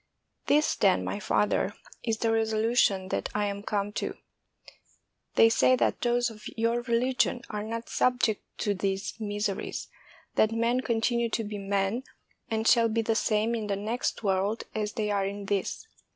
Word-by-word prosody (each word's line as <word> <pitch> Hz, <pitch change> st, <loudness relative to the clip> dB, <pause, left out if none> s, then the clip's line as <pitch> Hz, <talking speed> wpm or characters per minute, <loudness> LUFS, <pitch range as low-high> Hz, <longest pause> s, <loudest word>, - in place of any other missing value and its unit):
This, 300 Hz, +1 st, +4 dB
then, -, -, +3 dB
my -, -, -3 dB
father, -, -, +1 dB, 0.3 s
is 225 Hz, -2 st, 0 dB
the 230 Hz, -, 0 dB
reso 220 Hz, -1 st, +1 dB
lution 215 Hz, -4 st, +2 dB
that -, -, -1 dB
I 210 Hz, 0 st, +1 dB
am 200 Hz, 0 st, -3 dB
come 205 Hz, -1 st, -1 dB
to: -, -, -4 dB, 1.2 s
They 225 Hz, -, +7 dB
say 130 Hz, -, +4 dB
that 115 Hz, -4 st, 0 dB
those 240 Hz, -1 st, +2 dB
of 215 Hz, -1 st, -10 dB
your 230 Hz, +1 st, +1 dB
religion 245 Hz, +1 st, +1 dB
are 210 Hz, -1 st, -3 dB
not 230 Hz, +2 st, -5 dB
subject 245 Hz, -4 st, +1 dB, 0.2 s
to 205 Hz, -, +1 dB
these 195 Hz, +1 st, -2 dB
miseries, 205 Hz, -2 st, -3 dB, 0.4 s
that 220 Hz, +1 st, +3 dB
men 235 Hz, +2 st, +1 dB
con 235 Hz, -3 st, 0 dB
tinue 235 Hz, 0 st, +1 dB
to 225 Hz, -, +1 dB
be 205 Hz, -1 st, -5 dB
men 195 Hz, +3 st, 0 dB, 0.5 s
and 220 Hz, 0 st, 0 dB
shall 230 Hz, -2 st, +5 dB
be 225 Hz, +1 st, 0 dB
the 225 Hz, -, +1 dB
same 220 Hz, 0 st, +1 dB
in 220 Hz, -2 st, -2 dB
the 200 Hz, -, 0 dB
next 220 Hz, +4 st, -2 dB
world 195 Hz, +2 st, 0 dB
as 210 Hz, -1 st, -2 dB
they 210 Hz, -3 st, -1 dB
are 200 Hz, -1 st, +1 dB
in 200 Hz, 0 st, -5 dB
this. 200 Hz, -, -2 dB
220 Hz, 175 wpm, -28 LUFS, 200-230 Hz, 1.2 s, They